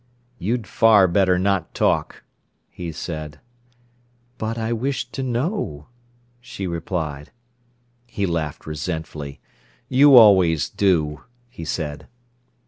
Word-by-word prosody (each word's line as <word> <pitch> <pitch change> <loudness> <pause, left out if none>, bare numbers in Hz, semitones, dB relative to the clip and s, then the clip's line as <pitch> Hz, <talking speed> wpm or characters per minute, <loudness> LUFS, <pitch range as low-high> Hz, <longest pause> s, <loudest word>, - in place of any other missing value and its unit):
"You'd 115 +4 -2
far 105 -3 +5
better 90 +1 +2
not 95 -2 -1
talk," - - 0 0.5
he 85 -2 -6
said. 75 -2 -6 1.0
"But 110 +1 -3
I 115 +1 -1
wish 130 +4 -2
to 135 - -5
know—" 125 - -3 0.5
she 120 -5 -7
replied. 80 -4 -4 0.8
He 100 -4 -2
laughed 80 -5 -3
resentfully. 75 -2 -5 0.5
"You 140 +1 +6
always 95 - +6
do," 80 -7 +1 0.3
he 85 - -9
said. 75 -2 -4
90 Hz, 105 wpm, -22 LUFS, 80-115 Hz, 1.0 s, You